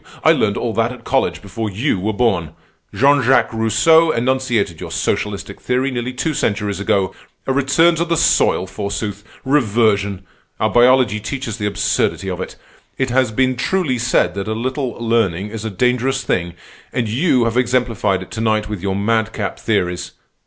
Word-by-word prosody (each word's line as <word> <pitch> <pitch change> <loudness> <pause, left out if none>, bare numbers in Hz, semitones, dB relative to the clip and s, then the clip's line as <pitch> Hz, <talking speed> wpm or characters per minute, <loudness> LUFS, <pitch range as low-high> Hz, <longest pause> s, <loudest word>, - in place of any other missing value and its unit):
I - - +6
learned - - +1
all - - -2
that - - +1
at - - -11
college - - 0
before 105 +3 -4
you 105 +2 -1
were 105 +4 -1
born. 100 -9 0 0.4
Jean 140 +7 +3
Jacques 130 -1 +3
Rousseau 115 +10 +4
enunciated 120 - 0
your - - -6
socialistic 100 -1 -3
theory 130 +2 0
nearly 120 0 -3
two 145 +5 -2
centuries 100 -6 -1
ago. 95 -2 0 0.3
A 135 - 0
return 140 +5 +3
to 170 - 0
the 170 -1 0
soil, 95 - +3
forsooth! 100 +1 -4 0.2
Reversion! 105 -7 +1 0.4
Our - - +1
biology 120 -3 +4
teaches 115 +1 -5
the 105 - -1
absurdity 100 -1 0
of 90 0 -4
it. - - -6 0.4
It 130 -2 -1
has 130 -2 +2
been 130 +3 +1
truly 135 -1 0
said 100 -6 +1
that 100 +1 -4
a 110 - -1
little 130 +2 -2
learning 105 -5 0
is 110 -1 -6
a - - -1
dangerous 125 +6 0
thing, 85 -1 -1 0.4
and 120 -3 -1
you 125 +1 +2
have 115 0 -1
exemplified 115 -6 +1
it - - -16
to 110 - -4
night 110 -1 +1
with 105 -4 -5
your 95 0 -1
madcap 110 0 -1
theories. 90 -5 -1
115 Hz, 175 wpm, -18 LUFS, 100-130 Hz, 0.4 s, I